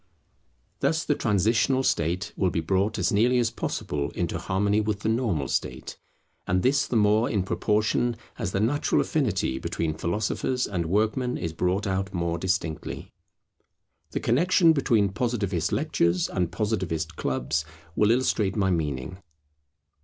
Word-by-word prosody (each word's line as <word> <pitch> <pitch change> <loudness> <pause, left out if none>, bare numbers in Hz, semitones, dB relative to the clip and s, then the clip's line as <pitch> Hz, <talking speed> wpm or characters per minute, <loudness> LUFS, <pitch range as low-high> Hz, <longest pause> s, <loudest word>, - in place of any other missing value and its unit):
Thus 160 0 +1
the 145 - +1
transitional 115 +4 +2
state 90 0 0
will 95 - +1
be 85 - -1
brought 95 +5 0
as - - +1
nearly 120 +4 +3
as 120 -2 +2
possible 70 -10 -3
into - - -2
harmony 100 +3 +1
with 105 -1 -2
the 110 - 0
normal 110 - 0
state; - - -3 0.5
and 90 0 +1
this 135 +2 +2
the - - -3
more 110 +1 +3
in 100 -4 0
proportion 110 +4 +1 0.2
as - - -2
the 95 - -1
natural 125 +8 +1
affinity 100 - 0
between 80 -2 -2
philosophers 105 +9 -1
and 85 -4 -2
workmen 110 +7 0
is 85 -3 -4
brought 90 +5 0
out 95 0 -2
more 85 -1 -1
distinctly. 95 -4 -3 1.0
The - - -3
connexion 165 +6 +4
between 115 -8 +2
Positivist 100 -5 -1
lectures 90 - +1
and 90 -2 -1
Positivist 90 -6 -2
clubs 70 +3 -1 0.3
will 105 - +3
illustrate 115 -5 +1
my 95 -3 +1
meaning. 75 0 -2
100 Hz, 145 wpm, -26 LUFS, 85-115 Hz, 1.0 s, connexion